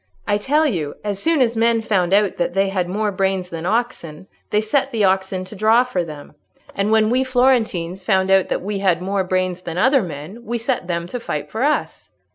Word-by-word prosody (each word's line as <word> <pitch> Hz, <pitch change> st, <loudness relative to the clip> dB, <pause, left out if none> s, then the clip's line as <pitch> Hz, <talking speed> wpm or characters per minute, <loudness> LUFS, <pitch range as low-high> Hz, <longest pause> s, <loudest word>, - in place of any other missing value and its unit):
I 205 Hz, -, +1 dB
tell 295 Hz, +8 st, +2 dB
you, 165 Hz, -, -2 dB
as 205 Hz, -2 st, -3 dB
soon 325 Hz, -3 st, +2 dB
as 235 Hz, -2 st, +2 dB
men 230 Hz, 0 st, +2 dB
found 190 Hz, -5 st, +1 dB
out 200 Hz, -1 st, +2 dB
that 175 Hz, +1 st, -1 dB
they 195 Hz, 0 st, +2 dB
had 185 Hz, -2 st, -1 dB
more 210 Hz, +2 st, -1 dB
brains 190 Hz, -1 st, -1 dB
than 165 Hz, +1 st, -4 dB
oxen, 190 Hz, -7 st, -2 dB, 0.2 s
they 210 Hz, -, +2 dB
set 265 Hz, +6 st, 0 dB
the 225 Hz, -3 st, 0 dB
oxen 190 Hz, -1 st, +1 dB
to 190 Hz, -, -11 dB
draw 220 Hz, +4 st, +4 dB
for 220 Hz, -9 st, -2 dB
them; 150 Hz, -3 st, -10 dB, 0.4 s
and 200 Hz, +2 st, -1 dB
when 220 Hz, 0 st, +3 dB
we 255 Hz, +2 st, +2 dB
Florentines 235 Hz, -9 st, +1 dB
found 190 Hz, -1 st, +2 dB
out 195 Hz, -1 st, +4 dB
that -, -, -2 dB
we 200 Hz, 0 st, -3 dB
had 185 Hz, -4 st, +2 dB
more 195 Hz, 0 st, 0 dB
brains 185 Hz, -1 st, -1 dB
than 170 Hz, -1 st, -6 dB
other 260 Hz, +7 st, +4 dB
men 175 Hz, +6 st, -8 dB
we 235 Hz, +2 st, -3 dB
set 235 Hz, -4 st, -2 dB
them 170 Hz, -1 st, -2 dB
to 245 Hz, -, -4 dB
fight 150 Hz, -10 st, -5 dB
for 220 Hz, -, -4 dB
us." 295 Hz, +3 st, -1 dB
195 Hz, 220 wpm, -20 LUFS, 185-230 Hz, 0.4 s, draw